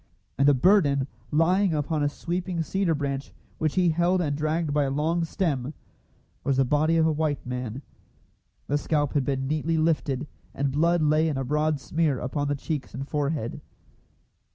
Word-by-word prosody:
And 140 +1 +3
the 145 - +6
burden, 140 -3 +4 0.2
lying 175 +3 +3
upon 150 +1 -1
a 145 - +2
sweeping 175 +2 -3
cedar 185 -1 0
branch 140 -1 -3 0.3
which 155 -2 0
he 180 -2 +3
held 175 +3 +2
and 150 -5 0
dragged 155 +1 -1
by 145 -1 +2
a - - -1
long 160 +5 0
stem, 150 -6 -2 0.7
was 140 -1 +1
the 135 - +4
body 155 +5 +2
of 160 - +4
a 160 - +3
white 150 -2 -1
man. 125 +1 -5 0.8
The 145 +1 0
scalp 145 -2 0
had 140 -3 +1
been 135 -1 -1
neatly 155 +2 0
lifted, 155 -3 0 0.3
and 140 0 0
blood 165 +3 +2
lay 155 +1 +3
in 150 -4 -1
a 135 - -1
broad 150 +2 0
smear 155 +1 0
upon 145 +4 -2
the 145 - 0
cheeks 145 0 -4
and 135 +2 -5
forehead. 145 -5 -2
150 Hz, 175 wpm, -26 LUFS, 140-165 Hz, 0.8 s, the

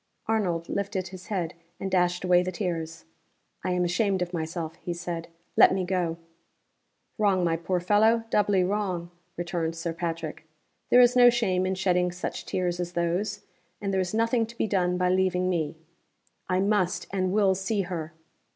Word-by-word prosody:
Arnold 180 -7 0
lifted 195 -2 -2
his 185 0 -11
head, 180 -5 -2 0.3
and 195 - -3
dashed 180 -1 +2
away 180 -1 +5
the 185 +1 -2
tears. 165 -4 -4 0.6
"I - - -1
am 180 0 +1
ashamed 190 +1 +1
of 175 0 -7
myself," 160 -1 -3
he 175 -1 -5
said. 170 -1 -5 0.3
"Let - - +7
me 185 -1 -1
go." 175 -3 -1 1.0
"Wrong, 195 -4 +3
my 165 -1 +2
poor 180 +2 -1
fellow 215 +5 +3
doubly 205 -3 +3
wrong!" 185 -3 -2 0.3
returned 170 -1 -2
Sir 165 0 -3
Patrick. 165 -2 -4 0.5
"There 250 - +7
is 245 0 +5
no 245 -1 +8
shame 185 -6 +1
in 190 - 0
shedding 180 -1 +1
such 180 +1 -5
tears 175 -1 -1
as 175 0 -3
those. 175 +4 -1 0.4
And 200 -1 -2
there 190 - +2
is 180 - -2
nothing 230 +1 +1
to 235 +1 -13
be - - +1
done 180 -4 +1
by 180 0 +2
leaving 185 0 +2
me." 165 -4 -1 0.7
"I 185 +1 +2
must 190 -3 +1
and 185 -1 0
will 200 -1 +4
see 195 +2 -1
her!" 170 -4 -4
180 Hz, 175 wpm, -27 LUFS, 175-195 Hz, 1.0 s, no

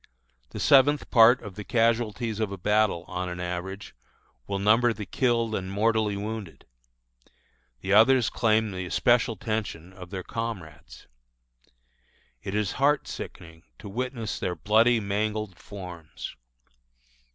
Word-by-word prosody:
The - - -7
seventh 145 +1 +4
part 120 +1 +6
of 105 -3 -8
the 105 +2 -7
casualties 115 -1 0
of 110 -3 -1
a 100 - -5
battle, 105 -2 +1
on 90 0 -4
an 90 0 -6
average, 90 +3 -5 0.5
will 100 - -2
number 115 +4 +3
the 105 -1 -7
killed 115 +1 0
and 95 -2 -3
mortally 110 0 +1
wounded; 105 -3 -6 1.2
the 95 - -1
others 120 +3 +5
claim 110 -1 +2
the 90 -1 -5
especial 120 +6 +2
attention 105 -6 -4
of 90 -2 -11
their 95 -1 -5
comrades. 110 -10 -7 1.4
It 95 - -5
is 105 -4 0
heart 145 +1 +3
sickening 80 -1 -8 0.2
to - - -10
witness 115 +1 -4
their 90 - -2
bloody, 110 +6 +3
mangled 105 -1 -2
forms. 90 -6 -9
105 Hz, 130 wpm, -26 LUFS, 95-115 Hz, 1.4 s, part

